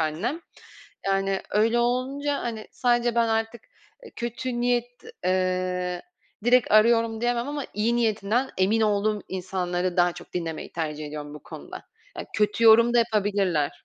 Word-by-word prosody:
annem. 175 - -2 0.7
Yani, 195 0 0
öyle 225 +3 +2
olunca, 265 +4 0
hani, 225 -2 -5
sadece 240 -1 +1
ben 235 -1 +2
artık, 225 +1 -1 0.4
ııı, 460 - -13
kötü 240 +1 -3
niyet, 245 0 +1 0.4
ııı, 185 -1 0 0.4
direkt 245 0 +4
arıyorum 225 +1 +4
diyemem. 240 +2 0
Ama 290 -1 -3
iyi 225 +3 +1
niyetinden 225 +2 0
emin 200 +4 +2
olduğum 210 -1 +1
insanları 180 -1 -2
daha 175 -1 +4
çok 175 0 -13
dinlemeyi 165 -3 -4
tercih 155 -2 -4
ediyorum 150 0 -7
bu 150 - -11
konuda. - - -10 0.3
Yani, - - -6
kötü 210 +2 +1
yorum 230 +2 +7
da 240 - +5
yapabilirler 200 -10 0
215 Hz, 145 wpm, -25 LUFS, 185-240 Hz, 0.7 s, yorum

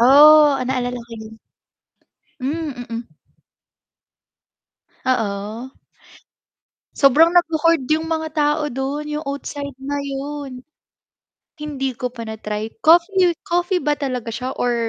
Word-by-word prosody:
Oh, 290 +3 +7
naalala 250 -1 -2
ko 235 - -25
yun. 220 0 -10 1.1
Hmm, 305 +3 -2 0.2
mm. 230 +1 -3 2.0
Oo. 220 +1 -2 1.2
Sobrang 320 +6 +5
nagho-hoard 330 -3 +3
yung 320 +1 +1
mga 320 -1 -2
tao 300 0 +1
dun, 275 +4 -3
yung 300 0 -4
oatside 280 0 -5
na 285 +1 -3
yun. 275 -2 -6 1.0
Hindi 275 -3 -3
ko 250 - -2
pa 240 -2 -8
na-try 220 0 -5
coffee 350 +2 +4
coffee 350 +1 0
ba 295 +1 +2
talaga 250 -5 -3
siya 255 +3 -4
or 245 -1 0
280 Hz, 110 wpm, -20 LUFS, 250-310 Hz, 2.0 s, Oh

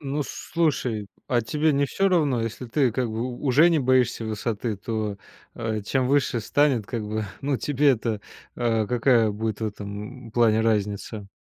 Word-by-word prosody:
Ну, 145 0 -2
слушай, 130 -10 -1 0.2
а 120 -2 +2
тебе 150 +7 +1
не 140 0 +2
всё 195 +8 +1
равно? 145 -10 +2
Если 115 +3 -5
ты 130 0 +1
как 125 0 -1
бы 110 +1 -3
у 125 -1 -5
уже 150 +7 +6
не 165 - +3
боишься 130 -3 +2
высоты, 110 0 -2
то, 105 0 -3 0.4
э, 110 -2 -2
чем 130 +5 0
выше 135 -4 +2
станет, 135 -1 +2
как 115 -3 -3
бы, 110 +1 -2 0.2
ну, 140 -1 0
тебе-то, 125 -6 +1 0.4
а, 115 -3 +1
какая 120 -1 +3
будет 110 +1 -3
в 110 - 0
этом 105 +4 -7
плане 110 -1 +3
разница? 105 -1 -1
120 Hz, 170 wpm, -25 LUFS, 110-135 Hz, 0.4 s, уже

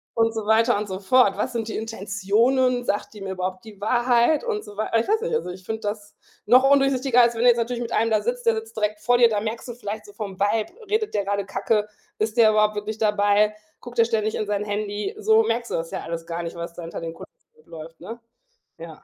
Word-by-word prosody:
und 225 0 +2
so 220 -2 -3
weiter 225 +1 +3
und 210 0 -3
so 190 0 -4
fort. 200 -1 +3
Was 250 +4 -2
sind 225 -2 -3
die - - -3
Intentionen? 225 +4 +1
Sagt 205 -1 -2
die 210 - -11
mir 195 - -4
überhaupt 185 0 -4
die 215 -3 -13
Wahrheit 240 +6 +2
und 440 -3 -2
so 205 - -11
wei 215 - -3
a 230 - +3
ich - - -2
weiß 440 +2 +2
nicht, 480 0 -3
also, 465 - -1
ich 185 +1 -9
finde 220 +3 -4
das 205 0 -5 0.3
noch 255 +5 +6
undurchsichtiger, 270 -3 +4
als 235 0 +4
wenn 225 - -2
du 245 - +5
jetzt 240 -1 +6
natürlich 235 +1 -2
mit 235 -1 -4
einem 225 0 +1
da 215 -1 +3
sitzt, 245 +2 -3
der 230 - +4
sitzt 220 0 -7
direkt 210 0 -1
vor 245 +3 +2
dir. 240 -1 +6
Da 210 -2 0
merkst 220 +4 -5
du 240 - -4
vielleicht 215 -2 -6
so 205 - -13
vom 200 -3 -6
Vibe, 210 +2 0 0.2
redet 430 0 0
der 205 -1 0
grade 200 0 -2
Kacke? 210 +1 0 0.3
Ist 215 +1 -1
der 220 -2 +7
überhaupt 215 0 +2
wirklich 210 +1 -4
dabei? 210 0 +2 0.2
Guckt 245 0 -11
der 230 - +5
ständig 220 -1 -1
in 215 - -2
sein 205 0 -1
Handy? 205 0 -3
So 220 +1 +4
merkst 230 +2 -2
du - - 0
das 165 0 -3
ja - - -4
alles 165 0 -5
gar 170 0 -4
nicht, 170 - -6
was 170 0 -6
da 175 - -8
hinter 165 - -7
den 165 0 -5
Kulissen - - -12 0.3
noch - - -33
läuft, 165 0 -11
ne? 230 +1 -8 0.6
Ja. 165 -2 -11
215 Hz, 260 wpm, -23 LUFS, 205-235 Hz, 0.6 s, der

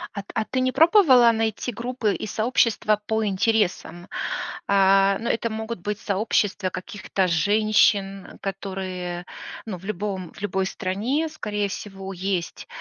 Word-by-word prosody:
А 200 - -3
т - - -22
а 220 - 0
ты 260 - -2
не 255 0 +1
пробовала 300 - +6
найти 225 +1 -1
группы 235 -1 -1
и - - -5
сообщества 215 -2 +1
по 220 0 0
интересам? 190 -3 0 0.6
А, 195 0 +4
ну, 230 - -4
это 230 0 0
могут 220 0 -5
быть 210 +3 -4
сообщества 205 -1 0
каких-то 190 0 -2
женщин, 200 +1 +2
которые, 185 -2 -4 0.4
ну, 210 -5 -5
в 180 - -14
любом 195 -3 -4
в - - -15
любой 190 -1 -1
стране, 225 +13 -1
скорее 210 -9 -2
всего, 195 -1 -7
есть 185 -2 -3
205 Hz, 140 wpm, -24 LUFS, 190-225 Hz, 0.6 s, пробовала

